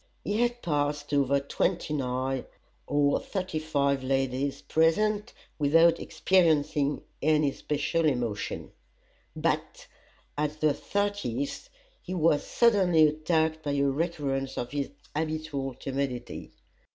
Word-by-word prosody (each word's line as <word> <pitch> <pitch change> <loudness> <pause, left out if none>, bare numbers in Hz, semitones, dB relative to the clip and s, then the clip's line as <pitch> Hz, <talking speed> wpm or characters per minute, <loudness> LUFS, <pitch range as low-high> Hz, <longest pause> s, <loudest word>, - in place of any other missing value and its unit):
He 210 +3 0
had 240 0 0
passed 145 -2 -1
over 140 0 +3
twenty 150 +3 -1
nine 130 -1 -1 0.4
of 145 -1 +3
the - - +1
thirty 185 -5 -3
five 140 -3 0
ladies 135 +1 -1
present 210 +7 +2 0.3
without 165 +3 +5
experiencing 150 -5 +2 0.2
any 150 -1 +3
special 150 +4 -1
emotion; 120 -8 -2 0.6
but - - -2 0.5
at 150 +1 -2
the 155 -1 +3
thirtieth 200 - -2 0.3
he 185 - -5
was 155 -3 +3
suddenly 190 -9 +4
attacked 160 +1 +1
by 145 -2 -2
a 140 0 +1
recurrence 140 -2 -1
of 120 - -3
his 140 -1 -2 0.3
habitual 155 -4 -2
timidity. 135 -2 -4
150 Hz, 115 wpm, -28 LUFS, 140-165 Hz, 0.6 s, without